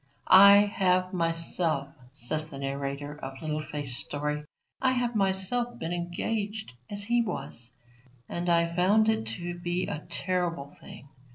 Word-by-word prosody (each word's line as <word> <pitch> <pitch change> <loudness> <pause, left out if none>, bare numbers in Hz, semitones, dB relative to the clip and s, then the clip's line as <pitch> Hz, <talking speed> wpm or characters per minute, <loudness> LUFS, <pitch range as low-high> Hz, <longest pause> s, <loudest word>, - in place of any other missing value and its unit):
I 200 +1 +10
have 185 -2 +1
myself, 165 -4 0 0.2
says 155 +4 -3
the 140 - -8
narrator 140 +1 -4
of 135 0 -6
Little 155 -1 -2
Faith's 145 -5 -3
story, 150 +2 -2 0.4
I 260 -1 +3
have 245 -2 0
myself 195 +5 0
been 165 +2 -3
engaged 205 - -3 0.2
as 205 0 -2
he 235 +3 +2
was, 150 - -4 0.6
and 175 +1 -3
I 170 0 +2
found 205 +5 +4
it 220 - 0
to 175 +10 -5
be 175 +1 -1
a 150 - -5
terrible 170 -6 -2
thing. 140 - -12
175 Hz, 145 wpm, -28 LUFS, 150-200 Hz, 0.6 s, I